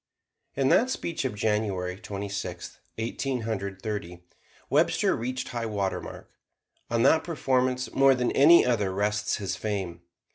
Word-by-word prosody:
In 135 Hz, -1 st, +2 dB
that 250 Hz, -, +4 dB
speech 170 Hz, -, -3 dB
of 125 Hz, -, -2 dB
January 105 Hz, -4 st, -1 dB
Twenty 100 Hz, 0 st, -6 dB
sixth, 100 Hz, -3 st, -6 dB, 0.2 s
Eighteen 125 Hz, +3 st, -2 dB
Hundred 100 Hz, -4 st, -4 dB
Thirty, 95 Hz, -5 st, -5 dB, 0.4 s
Webster -, -, +2 dB
reached 125 Hz, +2 st, -4 dB
high 115 Hz, -2 st, -3 dB
water 100 Hz, -3 st, -2 dB
mark. -, -, -10 dB, 0.6 s
On 115 Hz, 0 st, +1 dB
that 160 Hz, -, +5 dB
performance, 130 Hz, -6 st, 0 dB
more 135 Hz, 0 st, +5 dB
than 125 Hz, -1 st, 0 dB
any 160 Hz, +5 st, +7 dB
other, 105 Hz, -6 st, +1 dB
rests 105 Hz, +2 st, 0 dB
his 100 Hz, -2 st, -3 dB
fame. 95 Hz, -5 st, -4 dB
110 Hz, 145 wpm, -27 LUFS, 100-130 Hz, 0.6 s, any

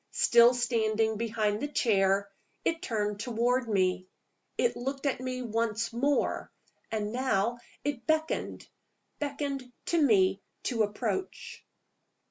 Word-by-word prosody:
Still 235 Hz, +1 st, +6 dB
standing 220 Hz, -2 st, +1 dB
behind 215 Hz, -1 st, 0 dB
the 290 Hz, -, -1 dB
chair, 200 Hz, -7 st, +2 dB, 0.4 s
it 330 Hz, 0 st, 0 dB
turned 210 Hz, -, -2 dB
toward 240 Hz, +2 st, 0 dB
me. 185 Hz, -2 st, +1 dB, 0.5 s
It 480 Hz, -, +2 dB
looked 270 Hz, +3 st, -4 dB
at 275 Hz, -, 0 dB
me 255 Hz, 0 st, -3 dB
once 230 Hz, 0 st, -1 dB
more. 275 Hz, +4 st, 0 dB, 0.4 s
And 215 Hz, -1 st, -2 dB
now 240 Hz, -2 st, 0 dB, 0.2 s
it 275 Hz, -5 st, -3 dB
beckoned 315 Hz, 0 st, -1 dB, 0.5 s
beckoned 280 Hz, -3 st, -3 dB
to 340 Hz, -1 st, +2 dB
me 195 Hz, -7 st, +4 dB, 0.2 s
to 235 Hz, -3 st, 0 dB
approach. 220 Hz, -, -3 dB
235 Hz, 115 wpm, -29 LUFS, 210-265 Hz, 0.5 s, Still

